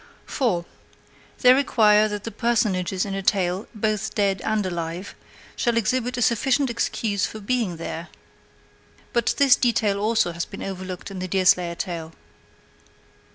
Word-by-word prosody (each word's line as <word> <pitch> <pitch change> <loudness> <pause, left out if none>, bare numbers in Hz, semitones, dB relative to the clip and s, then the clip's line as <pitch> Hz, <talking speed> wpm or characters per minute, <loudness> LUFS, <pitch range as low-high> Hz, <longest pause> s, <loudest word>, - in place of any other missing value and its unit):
4. 195 - -1 0.8
They 250 0 +8
require 215 -6 +4
that 210 -1 -5
the 230 - -5
personages 200 -6 0
in 200 - -4
a 195 - -2
tale, 190 0 0
both 215 -1 -1
dead 195 -3 +1
and 215 -2 0
alive, 175 +1 -4 0.4
shall 235 -2 0
exhibit 245 +2 0
a 245 - +1
sufficient 260 +3 +2
excuse 215 -3 -1
for 220 - -8
being 215 -5 -1
there. 165 +1 -6 1.1
But 235 - +1
this 280 -3 +6
detail 220 -5 +1
also 215 -3 +1
has 170 0 -3
been 195 - -9
overlooked 185 0 -6
in 190 - -6
the 185 - -3
Deerslayer 180 -2 +2
tale. 165 -3 -5
205 Hz, 145 wpm, -23 LUFS, 185-230 Hz, 1.1 s, They